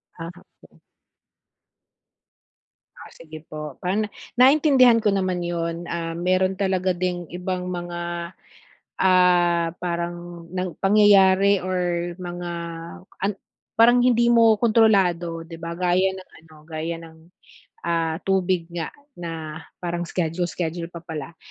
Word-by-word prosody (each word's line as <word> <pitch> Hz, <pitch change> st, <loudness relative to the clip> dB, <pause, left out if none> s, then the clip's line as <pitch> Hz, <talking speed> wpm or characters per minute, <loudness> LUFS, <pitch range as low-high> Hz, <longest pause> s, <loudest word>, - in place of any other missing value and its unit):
Ah, 165 Hz, 0 st, -7 dB, 0.3 s
okey. -, -, -20 dB, 2.2 s
Ah, -, -, -13 dB
sige 155 Hz, -1 st, -12 dB
po. 150 Hz, -2 st, -7 dB
Pan 205 Hz, +4 st, 0 dB, 0.3 s
naintindihan 260 Hz, -3 st, +6 dB
ko 210 Hz, -, +4 dB
naman 185 Hz, -2 st, -1 dB
yun. 170 Hz, 0 st, -3 dB
Ah, 165 Hz, -1 st, -3 dB
meron 185 Hz, +2 st, +1 dB
talaga 190 Hz, -1 st, +1 dB
ding 175 Hz, -1 st, -2 dB
ibang 180 Hz, 0 st, -3 dB
mga, 175 Hz, -1 st, -4 dB, 0.7 s
ah, 175 Hz, -2 st, +4 dB
parang 175 Hz, -1 st, -4 dB
nang 180 Hz, -2 st, -3 dB
pangyayari 200 Hz, -1 st, +5 dB
or 175 Hz, -2 st, -1 dB
mga 175 Hz, -1 st, -6 dB, 0.7 s
an 200 Hz, -, +2 dB, 0.5 s
parang 240 Hz, +2 st, +6 dB
hindi 240 Hz, -1 st, +3 dB
mo 230 Hz, -2 st, +5 dB
kontrolado, 190 Hz, -8 st, +2 dB
'di 165 Hz, 0 st, -10 dB
ba? 170 Hz, 0 st, -4 dB
Gaya 180 Hz, +1 st, +2 dB
ng 185 Hz, -, -12 dB, 0.2 s
ano, 155 Hz, -1 st, -18 dB
gaya 160 Hz, +1 st, -4 dB
ng, 165 Hz, -1 st, -13 dB, 0.7 s
ah, 165 Hz, -1 st, 0 dB
tubig 185 Hz, -3 st, +1 dB
nga 170 Hz, -2 st, -3 dB, 0.3 s
na 160 Hz, -2 st, -6 dB, 0.2 s
parang 175 Hz, 0 st, -2 dB
schedule, 175 Hz, +1 st, -1 dB
schedule 170 Hz, -1 st, -4 dB
pa 170 Hz, -, -8 dB
pala. 160 Hz, -1 st, -7 dB
175 Hz, 120 wpm, -23 LUFS, 170-190 Hz, 2.2 s, naintindihan